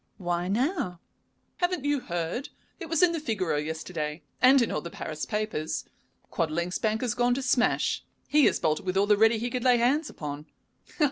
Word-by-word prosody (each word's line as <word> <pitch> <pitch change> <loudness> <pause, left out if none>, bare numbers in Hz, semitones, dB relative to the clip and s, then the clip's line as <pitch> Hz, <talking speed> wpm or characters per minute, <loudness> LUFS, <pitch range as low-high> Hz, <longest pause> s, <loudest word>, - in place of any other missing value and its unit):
"Why 175 -2 -2
now?" 215 - -1 0.6
"Haven't 355 -5 -1
you 290 -1 +2
heard? 175 - -3 0.3
It 335 -4 -7
was 330 +1 +2
in 355 - +6
the 330 - -2
Figaro 210 - -1
yesterday, 155 0 -4 0.2
and 265 +2 +7
in 235 - +1
all 150 - -1
the 170 - -7
Paris 155 -2 -5
papers. 210 -7 -2 0.5
Quadling's 170 +2 -1
bank 220 0 0
has 245 -3 0
gone 245 0 +2
to 270 - -3
smash; 255 -1 +1 0.2
he 295 -2 +5
has - - +3
bolted 155 -1 0
with 185 0 -1
all 200 - +4
the 210 0 +5
'ready' 225 +2 +4
he 240 +2 -3
could 250 -2 -2
lay 250 -1 +5
hands 275 +7 +2
upon." 150 0 -7
215 Hz, 190 wpm, -27 LUFS, 170-260 Hz, 0.6 s, and